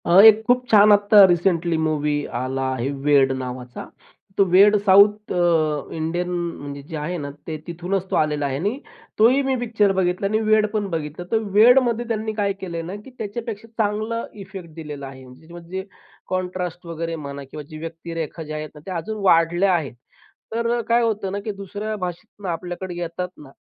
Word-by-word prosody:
अ, 175 +2 +6
एक 220 0 +8
खूप 250 +1 +3
छान 210 -1 +7
आत्ता 205 0 +7
रिसेंटली 175 -1 +1
मूवी 155 -2 0 0.3
आला 130 +1 -3
आहे 130 +1 -2
'वेड' 140 -2 +4
नावाचा. 125 -1 -6 0.5
तो 200 - +6
वेड 205 +3 +7
साऊथ 205 +2 +5
अ, 160 -4 +1
इंडियन 170 +3 -2
म्हणजे 165 -5 -4
जे 155 +3 -9
आहे 160 +4 -3
ना 145 -3 -5 0.2
ते 160 -1 -3
तिथूनच 180 +3 -3
तो - - +1
आलेला 150 -2 +1
आहे 135 -1 -2
आणि 205 - -2 0.4
तोही 245 +6 +5
मी 265 -1 +1
पिक्चर 220 -4 +2
बघितला 185 +1 0
आणि 215 +2 +1
वेड 215 0 +3
पण 210 -2 -1
बघितलं. 160 0 -4
तर 225 - +3 0.2
वेडमध्ये 240 +1 +5
त्यांनी 220 -1 -2
काय 205 -2 0
केलंय 170 -3 -4
ना, 175 +4 -6
की 210 +5 -11
त्याच्यापेक्षा 225 +1 -5 0.2
चांगला 215 +3 -2 0.2
इफेक्ट 190 -3 -9
दिलेला 150 -4 -7
आहे. 135 -1 -11 0.2
जे 160 +1 -17
म्हणजे 175 +2 -6 0.4
कॉन्ट्रास्ट 180 -1 -3
वगैरे 165 0 -4
म्हणा 140 -2 -7
किंवा 150 - -7
जे 155 - -8
व्यक्तिरेखा 165 0 -6
जे 155 0 -7
आहेत 155 0 -5
ना - - -11
ते 190 - -6
अजून 215 +7 -5
वाढल्या 175 +1 +4
आहेत. 155 -7 -1 0.6
तर 230 0 0
अ, - - -1
काय 235 +1 +3
होतं 210 -4 -1
ना, 200 - -3
की 215 +1 -4
दुसऱ्या 210 +3 -4
भाषेतून 195 +2 -7
आपल्याकडे 175 +2 -5
येतात 175 +1 -3
ना, 145 - -13
180 Hz, 185 wpm, -22 LUFS, 160-210 Hz, 0.6 s, एक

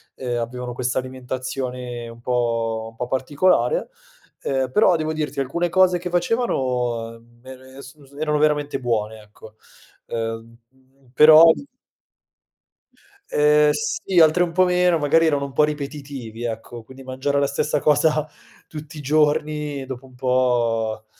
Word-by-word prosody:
ehm, 120 -2 -3
avevano 125 +1 -5
questa 125 +1 -1
alimentazione 130 -1 -5
un 115 0 -13
po 115 -2 -1
un - - -25
po' 125 - -4
particolare, 150 - +1 0.5
uhm, 130 -2 -1
però 185 -1 +4
devo 155 0 -2
dirti 155 -2 -4
alcune 170 +7 -1
cose 180 0 +3
che 180 +1 -5
facevano 125 - -1 0.2
me 130 +1 -13
es 140 +2 -12
su 140 +1 -19
erano 150 -1 0
veramente 145 -2 +1
buone, 110 -3 -2
ecco. 105 +1 -16 0.5
Uhm, 115 0 -5 0.6
però 155 +3 +8 1.9
Ehm, 150 0 +4
sì, 170 +4 -1
altre 160 +2 +5
un 175 - -2
po' 185 +2 +3
meno, 180 -1 +2
magari 165 +3 +3
erano 145 -3 +1
un 140 - -9
po' 150 - +3
ripetitivi, 140 -6 -5
ecco, 115 0 -6
quindi 130 +3 -14
mangiare 130 +2 -2
la 140 - +1
stessa 145 +1 -1
cosa 150 +1 +2 0.4
tutti 150 0 -10
i - - -7
giorni 150 -1 0
dopo 130 0 -8
un 130 - -18
po', 120 -4 0
135 Hz, 140 wpm, -22 LUFS, 120-150 Hz, 1.9 s, però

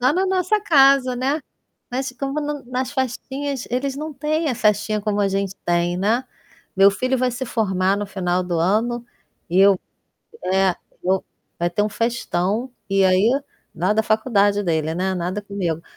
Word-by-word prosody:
Lá 255 +3 +4
na 375 +4 +1
nossa 375 +2 +1
casa, 275 -7 +5
né. 275 +5 0 0.5
Mas 265 +2 -2
como 275 +2 -2
no 295 -1 -4
nas 255 +1 -2
festinhas, 265 +1 -3
eles 265 +2 -1
não 305 +2 -5
têm 310 +3 -1
a 255 - 0
festinha 210 0 +1
como 205 0 -1
a 200 - +2
gente 195 0 -2
tem, 175 0 +1
né. 220 +7 +1 0.5
Meu 195 +1 +7
filho 255 +6 -1
vai 255 0 +1
se 250 +2 -4
formar 195 -5 +1
no 205 0 -3
final 185 -2 -1
do 175 -2 -2
ano 225 +7 +1 0.4
e 180 +2 +1
eu 195 -1 +6 0.7
eh, 190 -1 +2 0.3
eu 190 +1 +1 0.3
vai 175 0 0
ter 175 +4 0
um 210 - -1
festão 230 0 -1 0.2
e 195 0 +3
aí 185 +4 +4 0.4
na 185 +5 +1
da 220 +1 +2
faculdade 205 -2 +2
dele, 160 -3 0
né, 190 +2 0
nada 180 +4 -2
comigo, 190 -6 -3
215 Hz, 175 wpm, -21 LUFS, 190-260 Hz, 0.7 s, Meu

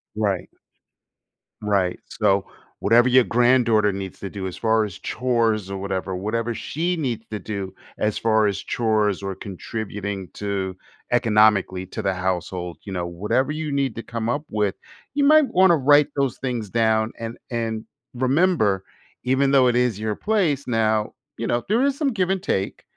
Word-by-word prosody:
Right. 100 -4 -1 1.1
Right. 100 -4 0
So, 100 -2 +1 0.3
whatever 120 +4 +4
your 130 0 +6
granddaughter 120 -3 +3
needs 95 -1 -6
to 100 - -5
do 95 -2 -5
as 90 - -7
far 110 -1 +2
as 100 -5 -6
chores 115 -5 0
or 100 - -3
whatever, 95 -1 -3
whatever 115 +5 -2
she 170 +9 -2
needs 120 -7 -3
to 105 - -3
do 100 -1 -5 0.2
as 105 -1 0
far 110 -1 +3
as 100 -1 -1
chores 105 -4 0
or 100 0 -3
contributing 100 0 -5
to 100 -2 -3 0.4
economically 105 -5 +3
to - - -5
the 95 - 0
household, 90 -2 -3
you 100 - -8
know, 90 -2 -2
whatever 105 +11 0
you 155 0 -3
need 140 -3 0
to 115 - -6
come 115 -1 -4
up 145 +5 -1
with, 105 -2 0 0.4
you 285 +1 +1
might 305 0 +6
wanna 185 -4 +5
write 145 0 +5
those 140 -3 0
things 120 -6 -3
down, 110 0 +2
and 115 +1 -6
and 115 -2 -3 0.3
remember, 130 - +2 0.4
even 135 +2 +2
though 135 -2 +5
it 120 - +2
is 120 -4 +1
your 110 -1 -2
place 175 - 0
now, 110 -2 +1 0.2
you 115 - -3
know, 120 +1 0
there 225 +4 +3
is 280 0 +1
some 285 -3 +1
give 190 -5 0
and 190 -1 -1
take. 95 - -2
110 Hz, 170 wpm, -23 LUFS, 100-130 Hz, 1.1 s, your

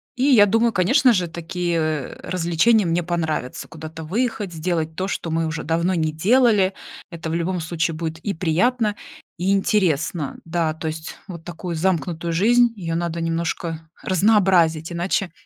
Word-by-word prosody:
И 250 - -1
я 245 -8 +7
думаю, 225 +2 +2
конечно 250 - +4
же, 180 -4 0
такие, 170 +1 -3
э, 155 -4 -2
развлечения 185 +5 +3
мне 170 +1 0
понравятся: 160 -6 -3
куда-то 160 0 -8
выехать, 210 +2 -2
сделать 160 -1 -2
то, 190 +2 -2
что 170 -3 -3
мы 165 0 0
уже 160 0 -4
давно 170 +4 0
не 160 -3 0
делали. 205 +2 +3 0.4
Это, 165 -1 -6
в - - -2
любом 175 +1 -1
случае, 165 0 -1
будет 160 0 -4
и 200 +3 -3
приятно, 205 +7 +1 0.4
и 185 +2 0
интересно. 175 -6 0
Да, 165 -1 0
то 160 0 -6
есть 160 +1 -5
вот 170 -4 -8
такую 175 0 -5
замкнутую 170 -1 -1
жизнь, 235 +6 +4
ее 165 -5 -4
надо 170 0 -2
немножко 165 -1 -3 0.2
разнообразить, 185 -5 +3
иначе 175 +1 -1
170 Hz, 160 wpm, -22 LUFS, 160-195 Hz, 0.4 s, я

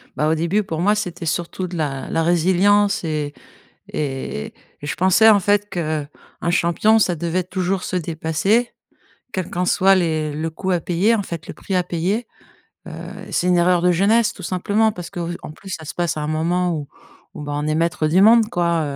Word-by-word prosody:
Bah, 150 - +1
au 160 - +2
début, 170 +6 0
pour 160 -3 -4
moi, 205 +3 +3
c'était 180 -5 -4
surtout 175 +3 -2
de 180 - -7
la 140 -4 -3
la 165 0 0
résilience 190 +4 +3
et 150 -2 -2 0.6
et 135 - -4 0.3
et - - -7
je 130 - -2
pensais, 190 +5 +5
en 205 -2 +6
fait, 205 +2 +1
qu'un 155 -4 -2 0.4
champion, 200 +6 +3
ça 180 -4 +2
devait 170 +3 -1
toujours 185 +1 -2
se 185 - -4
dépasser 170 +8 0 0.6
quel 185 -4 -3
qu'en 180 +1 -1
soit 195 +2 +4
les 160 -4 0
le 155 +2 -3
coût 185 +4 -4
à 175 -2 +1
payer, 185 +8 +2
en 210 - 0
fait, 170 -3 -7
le - - -6
prix 195 - -5
à 180 - +3
payer, 185 +7 -2 0.6
heu, - - -8 0.4
c'est 180 - 0
une 180 - +4
erreur 175 0 +3
de 180 - +4
jeunesse, 210 +5 +3
tout 185 - -12
simplement. 205 +4 +1
Parce 175 -3 -8
qu'en 170 -2 -5
plus, 195 +4 -12
ça 160 -3 -5
se 150 - -7
passe 175 -2 -1
à - - -2
un 150 - -2
moment 175 +3 0
où 145 -2 -5 0.5
où - - -7
ben, 145 0 -5
on 145 +1 -2
est 155 - +1
maître 165 -1 0
du 180 +5 +3
monde, 225 +1 +6
quoi, 170 -5 +1
175 Hz, 205 wpm, -20 LUFS, 160-195 Hz, 0.6 s, en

